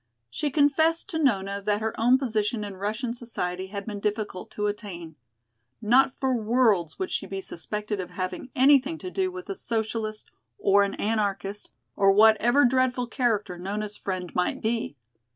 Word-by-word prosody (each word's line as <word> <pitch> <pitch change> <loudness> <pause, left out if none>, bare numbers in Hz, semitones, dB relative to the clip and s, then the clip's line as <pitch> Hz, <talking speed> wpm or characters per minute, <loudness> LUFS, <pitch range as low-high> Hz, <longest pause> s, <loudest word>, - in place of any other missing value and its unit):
She 300 - -1
confessed 315 +3 +2
to 320 - -2
Nona 200 -8 +1
that 205 +1 0
her 220 0 -2
own 245 +3 +4
position 220 -4 -1
in 200 -2 -6
Russian 215 +4 -2
society 190 -6 -4
had 200 0 -6
been 210 -2 -5
difficult 210 -2 -3
to 210 - -3
attain. 190 -6 -5 0.6
Not 245 +5 +4
for 265 -1 -1
worlds 220 -7 +2
would 375 - -3
she 195 - -2
be 195 0 -4
suspected 210 +3 -4
of 180 -1 -4
having 185 +7 -5
anything 280 +4 +4
to 365 +3 -7
do 375 -1 0
with 365 0 -8
a 390 - -4
Socialist, 220 - -3 0.3
or 200 +1 +4
an 200 0 0
Anarchist, 205 -2 -2 0.3
or 195 0 +5
whatever 220 +6 +5
dreadful 250 0 +2
character 215 -8 -1
Nona's 205 +3 -4
friend 185 -3 -4
might 180 - 0
be! 225 -8 -2
215 Hz, 165 wpm, -26 LUFS, 200-250 Hz, 0.6 s, or